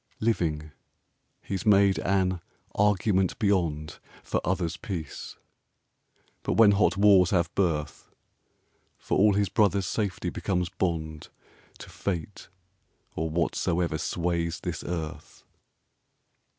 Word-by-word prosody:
Living, 80 -9 -1 0.7
he's 95 -2 -4
made 100 -3 +4
an 95 -2 0 0.3
'Argument 100 -2 +2
Beyond' 85 -7 0 0.2
For - - -1
others' 90 -2 -1
peace; 85 -7 -6 1.0
but - - -1
when 110 -2 +6
hot 100 0 +2
wars 100 -3 +6
have 85 -4 +1
birth, 75 -6 -1 0.9
For - - -2
all 105 +1 +5
his 100 -2 +1
brothers' 100 -2 +2
safety 100 0 -2
becomes 90 -2 -1
bond 80 -4 -3 0.5
To - - -11
Fate 95 0 -4 0.7
or 80 +1 -2
Whatsoever 85 0 0
sways 85 -1 -2
this 90 -2 -4
Earth. 80 -3 -6
90 Hz, 105 wpm, -27 LUFS, 85-100 Hz, 1.0 s, when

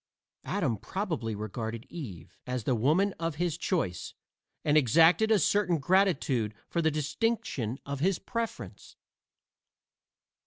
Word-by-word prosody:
Adam 150 - 0
probably 130 - -3
regarded 110 +2 -5
Eve 95 - -8
as 125 -2 -2
the 130 - +1
woman 155 - +2
of 165 -2 -2
his 170 0 -1
choice, 160 - -2 0.5
and 150 - +3
exacted 165 - +5
a 220 - +5
certain 200 -4 +2
gratitude 140 - +2
for 170 - -1
the 160 - +3
distinction 145 - -1
of 140 -1 -4
his 185 +4 +2
preference. 230 -2 -5
150 Hz, 120 wpm, -29 LUFS, 115-180 Hz, 0.5 s, exacted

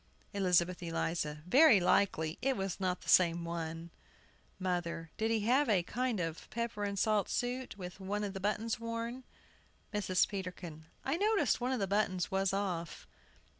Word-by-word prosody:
ELIZABETH 180 -2 +2
ELIZA. 165 -3 -2
Very 255 - +7
likely 175 -3 +2
it 270 -1 +1
was 195 -2 -3
not 185 -1 -1
the - - -14
same 170 -1 +4
one. 165 0 -5 0.7
MOTHER. 170 -3 -2
Did 220 +1 0
he 225 -1 +1
have 255 +5 +3
a 190 -5 +3
kind 245 +2 -1
of 165 -2 -4
pepper 235 -2 -3
and 200 -1 -2
salt 210 0 +2
suit, 245 -2 -2
with 180 0 -8
one 205 +2 -2
of 200 -2 -3
the 195 - -5
buttons 210 +3 -1
worn? 230 +2 -4 0.7
MRS. 195 -3 +2
PETERKIN. 180 -5 -6 0.2
I 275 +5 0
noticed 400 - +2
one 250 +2 0
of 260 - 0
the 195 - +1
buttons 195 -2 0
was 195 0 +1
off. 185 -4 -3
195 Hz, 165 wpm, -33 LUFS, 175-230 Hz, 0.7 s, Very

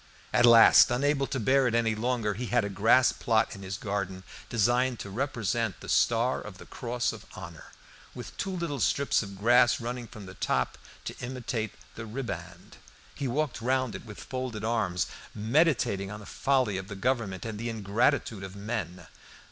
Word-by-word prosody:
At 120 0 +6
last, 115 +2 +8
unable 135 +2 +1
to 135 - -3
bear 130 +3 +3
it 115 - 0
any 115 -1 +2
longer, 115 -1 -1
he 120 +4 -5
had 120 -1 +2
a - - -3
grass 110 +6 +4
plot 110 -2 +1
in 100 - -10
his 95 0 -5
garden 100 -3 -3 0.3
designed 120 +3 +2
to 100 - -7
represent 115 -3 -1
the - - -10
Star 120 +2 +2
of 105 -3 -9
the - - -12
Cross 120 -1 -2
of - - -11
Honour - - -9 0.5
with - - -8
two - - -3
little 170 -7 -3
strips 140 +4 +2
of 100 -3 -8
grass 120 +4 +4
running 120 0 -5
from 105 -3 -11
the 95 - -10
top 65 -8 -1 0.3
to - - -5
imitate 125 -3 -4 0.2
the 115 0 -8
ribband. 90 -7 -7 0.4
He 140 - -3
walked 140 -1 -1
round 130 -1 0
it - - -7
with 105 -3 -10
folded 130 -5 -5
arms, 105 -6 0 0.3
meditating 110 - +1
on 105 +1 -7
the 105 - -11
folly 130 -7 +1
of 95 - -8
the 100 - -7
Government 105 -3 -1
and 110 -2 -5
the 120 +1 -3
ingratitude 110 -1 0
of 95 0 -8
men. 100 -5 -4
115 Hz, 180 wpm, -28 LUFS, 100-125 Hz, 0.5 s, last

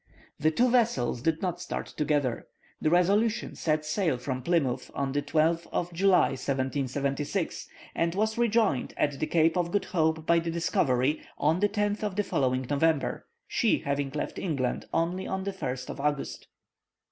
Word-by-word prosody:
The 155 - +3
two 235 +11 +3
vessels 215 - +2
did 160 +4 0
not 180 -3 -2
start - - -4
together. 145 -5 -1 0.3
The 155 - +2
Resolution 205 +7 +2
set 155 -1 0
sail 160 -3 0
from 130 +1 -4
Plymouth 140 -4 0
on 140 -1 -1
the 145 +1 0
12th 160 +3 +1
of 175 0 -2
July, 190 +2 +4
1776, 140 +5 -2 0.3
and 170 +1 0
was 220 +2 +1
rejoined 225 - +1
at 145 -2 0
the 155 - -1
Cape 165 -1 +3
by 170 -3 +1
the 165 0 -3
Discovery 150 -4 +1 0.2
on 155 +4 +2
the 205 +1 +3
10th 205 0 -1
of 210 -3 -2
the 205 - +1
following 130 -6 0
November, 145 +1 0 0.2
she - - +2
having 140 0 -1
left 145 +2 -4
England 140 -9 -2
only 175 +3 -1
on 190 0 -2
the 200 0 -3
1st 130 -8 -4
of - - -9
August. 145 0 -2
160 Hz, 160 wpm, -28 LUFS, 140-185 Hz, 0.3 s, July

